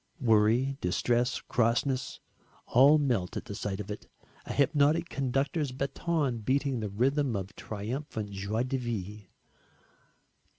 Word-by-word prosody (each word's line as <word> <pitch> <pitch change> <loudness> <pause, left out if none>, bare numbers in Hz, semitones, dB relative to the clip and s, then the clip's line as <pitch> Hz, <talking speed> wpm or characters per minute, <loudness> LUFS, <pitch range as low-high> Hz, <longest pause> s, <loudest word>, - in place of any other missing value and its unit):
Worry, 120 +3 +3
distress, 120 +7 +1
crossness, 125 +3 0 0.5
all 140 +5 +6
melt 120 -11 0
at - - -5
the - - -6
sight 100 -1 -4
of 105 0 -5
it 105 - -7 0.4
a - - -4
hypnotic 150 +4 +3
conductor's, 140 +2 -1
baton 135 0 -1
beating 130 +3 0
the 105 -2 -3
rhythm 130 +4 +1
of 95 +1 -5
triumphant 110 0 -5
joie 100 +4 -2
de 130 +1 -1
vivre. 105 -4 -5
125 Hz, 125 wpm, -29 LUFS, 105-140 Hz, 0.5 s, all